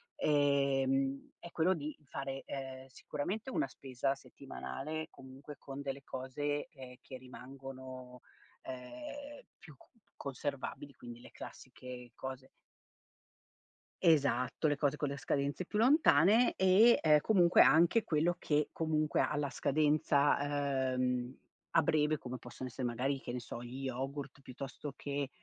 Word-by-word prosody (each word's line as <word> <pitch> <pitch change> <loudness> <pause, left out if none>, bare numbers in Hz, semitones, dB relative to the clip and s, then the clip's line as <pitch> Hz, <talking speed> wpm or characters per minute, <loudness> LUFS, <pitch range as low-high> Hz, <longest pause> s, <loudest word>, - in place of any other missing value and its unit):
ehm, 140 - +2
è 170 - -9
quello 175 +3 +3
di 155 -2 -5
fare, 135 0 -5
ehm, 130 -1 -6
sicuramente 195 - -4
una 315 +4 0
spesa 135 0 -2
settimanale 155 +3 -6
comunque 135 +2 -11
con 140 0 -7
delle 135 0 -5
cose, 145 +3 -3
che 130 -3 -12
che 130 - -9
rimangono, 130 -1 -10 0.4
ehm, 285 - -8 0.2
più 150 - -14
c - - -21 0.3
conservabili 140 +1 -5
quindi 120 -1 -10
le - - -13
classiche 125 -1 -10
cose. 130 0 -7 1.5
Esatto, 145 -4 +3
le 145 - +2
cose 145 0 +1
con 145 - -1
le 140 +1 -4
scadenze 140 +6 -1
più 210 - -2
lontane 230 - +5
e, 190 +6 +6
ehm, 150 -2 +6
comunque 180 -5 +5
anche 170 +8 +6
quello 165 +3 +1
che 150 -3 +1
comunque 155 -2 +1
ha 150 - 0
la 145 -1 0
scadenza, 145 -2 +2
ehm, 125 0 -1 0.3
a 165 - +5
breve 150 0 +2
come 125 -1 -6
possono 125 +2 -8
essere 125 +1 -4
magari, 130 +4 -1
che - - -5
ne 125 - -3
so, 120 0 -7
gli 130 +3 -7
yogurt 135 +2 -4
piuttosto 135 +2 -7
che, 140 -1 -3
140 Hz, 135 wpm, -34 LUFS, 130-155 Hz, 1.5 s, e